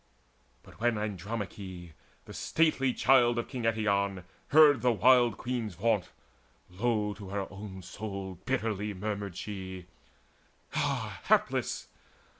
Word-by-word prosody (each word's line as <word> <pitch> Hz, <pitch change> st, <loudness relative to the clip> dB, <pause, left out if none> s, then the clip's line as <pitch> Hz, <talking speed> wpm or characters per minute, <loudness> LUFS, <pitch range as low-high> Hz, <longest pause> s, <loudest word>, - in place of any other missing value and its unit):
But -, -, -17 dB
when 120 Hz, -1 st, +2 dB
Andromache, 100 Hz, -3 st, -5 dB, 0.3 s
the -, -, -10 dB
stately 155 Hz, -5 st, +2 dB
child 120 Hz, -2 st, +4 dB
Of 120 Hz, -, -2 dB
king 125 Hz, -4 st, -4 dB
Eetion, 100 Hz, -4 st, +1 dB, 0.2 s
heard 150 Hz, -2 st, +7 dB
the 125 Hz, -, +4 dB
wild 120 Hz, -1 st, +5 dB
queen's 120 Hz, -6 st, -3 dB
vaunt, 105 Hz, 0 st, +1 dB, 0.6 s
Low 105 Hz, +1 st, 0 dB
to 100 Hz, -2 st, -10 dB
her 100 Hz, 0 st, -2 dB
own 95 Hz, -2 st, -8 dB
soul 95 Hz, -1 st, -6 dB
bitterly 105 Hz, -5 st, -1 dB
murmured 100 Hz, -1 st, -4 dB
she: 95 Hz, -3 st, -6 dB, 0.9 s
"Ah -, -, -1 dB
hapless! -, -, +1 dB
105 Hz, 115 wpm, -30 LUFS, 95-120 Hz, 0.9 s, heard